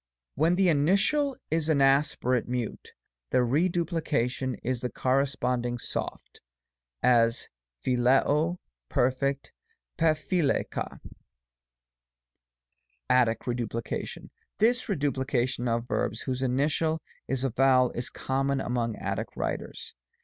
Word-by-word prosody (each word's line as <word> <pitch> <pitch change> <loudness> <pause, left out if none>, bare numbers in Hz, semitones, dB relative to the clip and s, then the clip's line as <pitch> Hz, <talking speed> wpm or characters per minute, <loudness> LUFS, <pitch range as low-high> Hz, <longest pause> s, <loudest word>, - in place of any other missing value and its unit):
When 160 +5 +2
the 190 -1 +3
initial 200 - +2
is 160 0 +1
an 150 -3 +3
aspirate 135 -3 +2
Mute, 125 -3 -4 0.4
the 125 - +3
reduplication 150 -4 0
is 125 -1 -1
in - - +1
the - - -11
corresponding 125 -2 0
soft - - -5 0.6
(§6. - - +4
9); - - +7
as, 115 0 +2 0.4
(piXs'COy 135 +7 +3 0.3
Perf. 135 +2 0 0.5
TttcpiXri 155 -1 +2
xu. - - -4 2.1
ATTIC 120 -3 +3
REDUPLICATION. 120 -2 -4 0.3
This 240 +3 +2
reduplication 130 - 0
of 115 +1 -1
verbs, 110 -2 -1
whose 130 -1 -3
initial 145 +5 +1 0.3
is 135 -1 -1
a 135 - 0
vowel, 130 0 +4
is 120 +1 -4
common 135 +1 -1
among 120 -3 -1
Attic - - -4
writers. - - -4
135 Hz, 110 wpm, -28 LUFS, 125-155 Hz, 2.1 s, 9